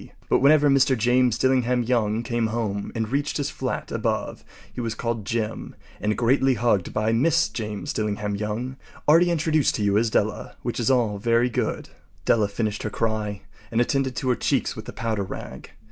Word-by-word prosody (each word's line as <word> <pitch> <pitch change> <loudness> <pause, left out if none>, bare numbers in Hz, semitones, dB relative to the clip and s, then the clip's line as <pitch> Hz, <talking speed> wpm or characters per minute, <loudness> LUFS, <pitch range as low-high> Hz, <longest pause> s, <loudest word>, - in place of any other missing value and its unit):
But - - +4
whenever 145 +2 +5
Mr. 135 -1 +4
James 120 +1 +3
Dillingham 125 -1 +2
Young 115 -2 0
came 115 -1 0
home 110 -3 -3
and 110 -1 -1
reached 140 +3 -1
his 145 +1 -2
flat 130 -4 -4
above - - -2 0.3
he - - -4
was 115 -2 -3
called 115 -2 -3
“Jim” 110 +1 -3 0.2
and 105 0 -1
greatly 130 +2 +3
hugged 115 -7 +1
by 110 +1 0
Mrs. 160 +8 +2
James 105 -3 -4
Dillingham 105 -1 -2
Young, 110 +6 -4 0.3
already 165 +4 +6
introduced 155 -3 +2
to 105 - -2
you 100 0 +3
as 115 0 +1
Della. - - -1
Which - - -3
is 120 - +1
all 115 -6 +2
very 115 +3 +2
good. - - -2 0.4
Della 110 -3 +3
finished 105 +1 -2
her 105 - -2
cry 105 -2 -2 0.3
and 115 - 0
attended 130 +1 +1
to 130 - -2
her 125 - +3
cheeks - - 0
with - - -8
the - - -8
powder 110 -2 -2
rag. 95 - -7
115 Hz, 185 wpm, -24 LUFS, 105-130 Hz, 0.4 s, already